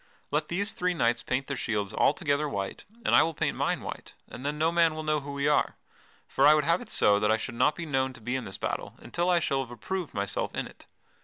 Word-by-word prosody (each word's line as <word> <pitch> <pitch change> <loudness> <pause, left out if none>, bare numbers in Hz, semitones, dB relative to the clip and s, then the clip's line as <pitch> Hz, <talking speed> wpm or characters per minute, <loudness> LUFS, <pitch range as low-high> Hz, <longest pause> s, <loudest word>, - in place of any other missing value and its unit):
Let 150 +1 0
these 200 +5 -1
three 180 0 0
knights 120 -5 +2
paint 130 +2 -1
their 140 - -3
shields 105 -5 -2
altogether 145 0 +2
white 100 -6 -4 0.2
and - - +2
I - - +8
will 165 -1 0
paint - - 0
mine - - 0
white, - - -8
and 125 - -9
then 145 +1 -2
no 160 +2 +2
man 165 -2 +3
will 155 - -4
know 155 0 +1
who 140 0 -7
we 140 +1 -1
are. 150 - +2 0.5
For 140 - +4
I 150 - +8
would 150 - +2
have 170 +2 +2
it - - -10
so 100 0 +4
that 105 - +1
I 110 - +4
should 115 - -5
not 150 +5 +2
be 170 - -5
known 135 -3 0
to 125 - -12
be 125 +4 -2
in 130 -3 -3
this 95 - -5
battle - - -3
until 175 +1 -2
I 175 -1 +4
shall 135 -4 0
have 125 - -12
approved 170 - -5
myself 100 -1 -2
in - - -1
it. - - -14
145 Hz, 260 wpm, -28 LUFS, 120-160 Hz, 0.5 s, I